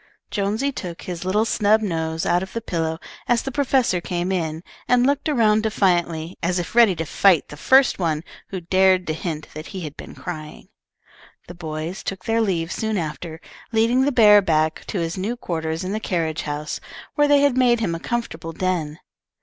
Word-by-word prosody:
Jonesy 215 +7 0
took 180 -9 -7
his 175 -2 -5
little 210 +4 +2
snub 215 -1 +3
nose 160 -4 -2
out 175 - +2
of 190 - -7
the 230 - -2
pillow 165 -6 -2 0.3
as 240 -1 +2
the 270 - -4
professor 260 -8 +1
came 175 +1 -2
in, 165 -3 -2 0.2
and 250 0 +4
looked 285 +2 +1
around 220 -6 +3
defiantly 175 -6 0
as 175 +2 0
if 175 -1 -4
ready 230 -5 +6
to 165 - -3
fight 180 0 +3
the - - -8
first 260 - +4
one 160 -3 0 0.2
who 190 - -5
dared 185 +1 +3
to 155 - -1
hint 155 -1 -5
that 155 +1 -8
he 190 -3 -6
had 150 -3 -6
been - - -10
crying. 155 -4 -8 0.8
The 175 - -8
boys 160 +1 -5
took 190 -2 -5
their 225 0 +2
leave 175 -5 0
soon 220 -1 -1
after, 160 0 -5 0.3
leading 230 +3 +3
the 280 +2 +2
bear 210 -5 +7
back 155 -3 0
to 205 - -3
his 165 +3 -3
new 220 +6 -2
quarters 160 -4 -3
in 185 - -3
the 215 - -1
carriage 165 -6 -1
house, 150 0 -4 0.3
where 295 -1 +3
they 290 -1 +5
had 285 -3 +3
made 245 -2 +4
him 200 -7 -1
a 165 - -4
comfortable 165 -8 -4
den. 165 -4 -2
185 Hz, 195 wpm, -22 LUFS, 165-220 Hz, 0.8 s, bear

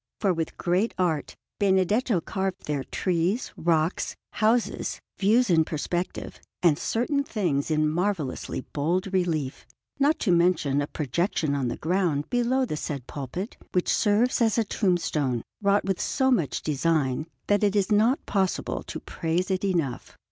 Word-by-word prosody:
For 195 -3 +2
with 165 -1 -3
great 185 +6 0
art 165 -6 0 0.2
Benedetto 200 +2 +2
carved 190 +2 -3
there 145 -3 -1
trees, 185 +5 -1
rocks, 165 +1 0 0.2
houses, 225 +2 +1 0.2
views 225 +5 +4
in 160 -2 +5
perspective, 175 +3 -3 0.2
and 160 -3 +4
certain 280 +5 0
things 175 - -1
in 155 -1 +2
marvellously 165 -6 -1
bold 180 +7 0
relief; 160 -7 -1 0.3
not 290 +3 +3
to 195 - +2
mention 170 -5 +3
a 145 - -2
projection 155 - -1
on 135 -3 0
the 120 - -3
ground 165 -4 0
below 245 +2 +2
the 155 - -3
said 140 -5 -4
pulpit, 150 - -6 0.2
which 180 - +2
serves 220 +5 +2
as 225 -2 +3
a 230 - +4
tombstone, 160 - 0 0.2
wrought 200 0 +3
with 195 -2 -1
so 265 -1 +1
much 175 - 0
design 155 -1 0 0.2
that 205 0 +2
it 205 0 +2
is 200 0 +1
not 225 +6 +3
possible 190 -3 -1
to - - -7
praise 175 +3 -2
it 185 0 0
enough. 165 -10 -2
180 Hz, 150 wpm, -26 LUFS, 155-205 Hz, 0.3 s, in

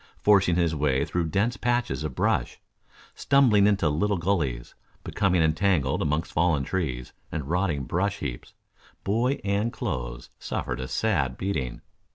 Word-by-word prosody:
Forcing 95 -4 +4
his 85 -2 +1
way 70 -3 +1
through 90 -1 -1
dense 100 +8 0
patches 120 -9 -1
of 75 -5 -4
brush, - - 0 0.5
stumbling 120 -8 +4
into 100 -6 +2
little 100 +7 +1
gullies, 80 -10 -1 0.3
becoming 90 -5 +1
entangled 80 -1 +1
amongst 75 0 -1
fallen 80 -4 +2
trees 65 -7 -3 0.2
and 75 -4 -4
rotting 85 -4 0
brush 100 +8 -1
heaps, 65 -9 -6 0.5
boy 120 +7 0
and 100 +3 0
clothes - - -5
suffered - - -4
a 65 - -4
sad - - 0
beating. 65 -11 -3
85 Hz, 140 wpm, -26 LUFS, 70-100 Hz, 0.5 s, Forcing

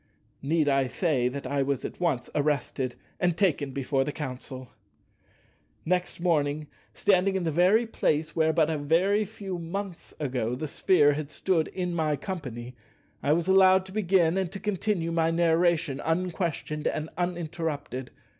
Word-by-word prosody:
Need 155 +2 +1
I 135 -2 +3
say 135 -4 +1
that 140 +2 -5
I 140 +2 0
was 135 -1 -1
at - - -7
once 160 -9 0
arrested 140 -3 -1 0.2
and 175 -2 +1
taken 160 -7 +1
before 135 0 0
the 150 - -3
Council? 130 -3 -7 1.2
Next 180 +1 -1
morning, 155 -3 +1 0.3
standing 195 -1 +2
in 190 - 0
the 165 - 0
very 185 +9 +4
place 155 -8 -1
where 160 -1 +3
but 160 0 +2
a 155 - -1
very 185 +8 +2
few 195 -3 -6
months 180 +2 -6
ago 125 -5 -1
the 155 +4 -4
Sphere 145 -1 +4
had 145 0 -4
stood 165 -1 0
in 180 -2 -3
my 155 -3 +1
company, 125 - -6 0.5
I 145 - +3
was 170 +2 0
allowed 190 0 +6
to 190 - -11
begin 190 -3 +2
and 185 -3 -2
to 195 - -5
continue 195 -4 -1
my 165 -1 +2
narration 165 -3 +2
unquestioned 165 -3 -2
and 155 +1 -2
uninterrupted. 165 -7 -3
160 Hz, 155 wpm, -27 LUFS, 145-180 Hz, 1.2 s, allowed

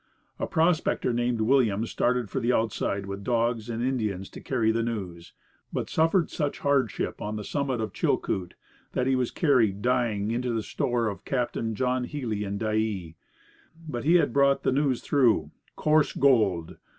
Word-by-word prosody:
A - - -1
prospector 160 -6 +1
named 120 -1 0
Williams 115 -3 +2
started 125 -2 +1
for 135 - -3
the 120 0 +1
outside 100 -3 -1
with 100 0 -6
dogs 115 -1 0
and 115 0 -2
Indians 110 -7 -2
to - - -10
carry 115 -4 +1
the 115 +1 0
news, 95 -7 -5 0.4
but - - -3
suffered 165 +2 +2
such 145 -3 -2
hardship 140 -6 0
on 105 +1 -3
the 105 - -4
summit 135 0 -2
of 110 - -3
Chilcoot 90 -2 -1 0.4
that 125 - 0
he 135 0 +2
was 125 -2 0
carried 115 - +2
dying 115 -4 +1
into 125 +1 -1
the 110 - -1
store 120 +1 -1
of 100 -2 -5
Captain 120 -3 -2
John 125 +1 0
Healy 120 -8 -3
at 100 0 -3
Dyea. 110 -6 -1 0.7
But 120 -6 -4
he 165 +4 +4
had 175 - +3
brought 140 0 +3
the - - +2
news 135 -2 +1
through 130 -6 +2 0.2
coarse 155 -1 +2
gold! 105 -12 +2
120 Hz, 170 wpm, -27 LUFS, 105-130 Hz, 0.7 s, he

